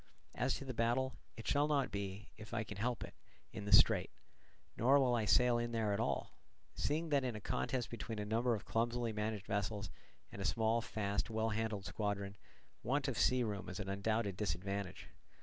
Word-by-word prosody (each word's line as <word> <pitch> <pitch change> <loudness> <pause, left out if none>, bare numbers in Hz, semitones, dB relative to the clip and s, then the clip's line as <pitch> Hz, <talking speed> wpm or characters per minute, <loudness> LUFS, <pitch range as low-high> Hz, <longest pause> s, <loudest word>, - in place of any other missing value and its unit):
As 125 +2 +1
to 140 - -6
the 130 - -4
battle, 120 +3 +1 0.2
it 115 - -7
shall 145 +1 +3
not 145 -3 +1
be, 100 +2 -5
if 110 +1 -8
I 110 - 0
can 105 -2 -8
help 120 +3 -1
it, - - -9 0.4
in 100 - -5
the 100 - -3
strait, 100 - +6 0.7
nor 135 +5 +5
will 130 -2 +3
I 115 -3 +2
sail 120 +5 +5
in 120 0 -2
there 110 -3 +1
at 100 - 0
all; - - -1 0.4
seeing 160 +3 -1
that 140 -3 +3
in 125 -3 -2
a - - -4
contest 125 +4 -2
between 115 -1 -5
a 105 - -2
number 115 +3 +2
of 105 - -7
clumsily 115 0 0
managed 105 -1 -2
vessels 105 +1 -2 0.4
and 100 - -7
a - - -1
small, 110 +3 +2
fast, 100 -1 -2
well 110 0 0
handled 110 -2 -2
squadron, 100 +2 -2 0.5
want 140 +2 0
of 135 - -1
sea 125 +3 +3
room 100 -5 -3
is 90 - -5
an 100 -1 -4
undoubted 100 0 0
disadvantage. 100 -1 -3
110 Hz, 200 wpm, -37 LUFS, 100-120 Hz, 0.7 s, strait